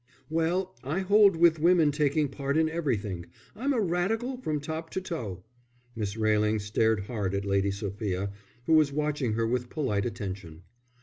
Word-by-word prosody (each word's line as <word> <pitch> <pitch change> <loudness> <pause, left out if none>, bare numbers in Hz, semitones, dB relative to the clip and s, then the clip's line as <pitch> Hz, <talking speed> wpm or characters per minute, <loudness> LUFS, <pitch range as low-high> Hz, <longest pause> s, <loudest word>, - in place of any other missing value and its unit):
"Well, 175 +4 0
I 155 +8 -1
hold 200 0 +5
with 165 -1 +4
women 165 -2 +4
taking 145 0 +1
part 140 +1 -2
in 160 0 +4
everything. 105 - -2 0.3
I'm 270 +6 -1
a 255 - +1
Radical 215 +7 0
from 155 -12 -2
top 160 +2 -5
to - - 0
toe." 115 - -5 0.5
Miss 105 -1 -3
Railing 110 0 +2
stared 105 +1 +1
hard 100 -2 -3
at 100 0 -2
Lady 100 0 +1
Sophia, 100 -1 -3 0.3
who 160 - +2
was 155 -3 +5
watching 150 -5 -1
her 115 +1 0
with 125 +1 -1
polite 120 -9 -1
attention. 95 -7 -6
140 Hz, 165 wpm, -28 LUFS, 105-165 Hz, 0.5 s, hold